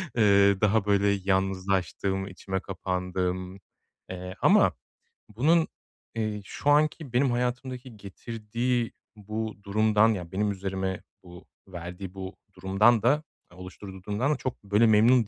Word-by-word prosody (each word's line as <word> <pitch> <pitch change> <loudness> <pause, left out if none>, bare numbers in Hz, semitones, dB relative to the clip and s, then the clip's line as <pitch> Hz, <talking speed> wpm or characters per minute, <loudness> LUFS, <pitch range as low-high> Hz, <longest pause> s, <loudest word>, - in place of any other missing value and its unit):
eee, 100 -3 +4
daha 105 0 +3
böyle 100 0 +3
yalnızlaştım, 95 0 0
içime 95 0 -4
kapandım, 90 0 -3 0.5
eee, 90 0 -6
ama - - +5 0.6
bunun, 160 +6 +3 0.5
eee, 110 -2 -2
şu 145 - -2
anki 150 -2 +2
benim 130 +1 +3
hayatımdaki 125 0 -3
getirdiği 115 +4 -3 0.2
bu 110 +1 -5
durumdan, 110 +2 +3
yani 90 -4 -6
benim 105 +2 0
üzerime 95 -1 -3 0.2
bu 90 0 -13 0.2
verdiği 90 +1 -7
bu 95 0 -7 0.2
durumdan 100 +5 +3
da 145 +6 +3 0.3
oluşturduğu 90 +1 -10
durumdan 110 +9 0
da - - -3
çok 130 -4 -5
böyle 105 +3 +3
memnun 110 +1 +5
100 Hz, 120 wpm, -27 LUFS, 95-115 Hz, 0.6 s, ama